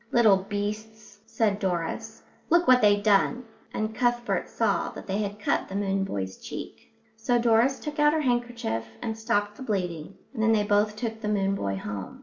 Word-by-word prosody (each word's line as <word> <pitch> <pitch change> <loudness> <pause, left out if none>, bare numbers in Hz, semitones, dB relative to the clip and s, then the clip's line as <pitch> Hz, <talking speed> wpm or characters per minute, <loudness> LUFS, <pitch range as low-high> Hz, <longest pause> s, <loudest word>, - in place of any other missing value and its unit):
"Little 220 -5 +5
beasts," 210 +2 -5
said 210 -3 0
Doris, 175 -4 -3 0.3
"look 345 +1 +4
what 255 0 +6
they've 205 -1 +4
done," 220 +4 +3 0.3
and 215 0 -2
Cuthbert 240 +1 0
saw - - 0
that - - -9
they 195 +1 -2
had 205 -1 -3
cut 205 - 0
the 190 - -6
moon 195 -1 0
boy's 95 - -4
cheek. - - -9 0.2
So 225 +2 +1
Doris 235 +3 +3
took 300 0 -6
out 295 0 +5
her 315 - +1
handkerchief 240 - -1 0.2
and 225 - -2
stopped 205 -2 -1
the - - -11
bleeding, 180 -7 -3 0.2
and 225 - -3
then 225 0 +4
they 210 -1 +3
both 205 0 +2
took 225 -1 -4
the 210 - -3
moon 195 -2 +1
boy 100 - -2
home. 100 -1 -6
210 Hz, 185 wpm, -26 LUFS, 195-235 Hz, 0.3 s, what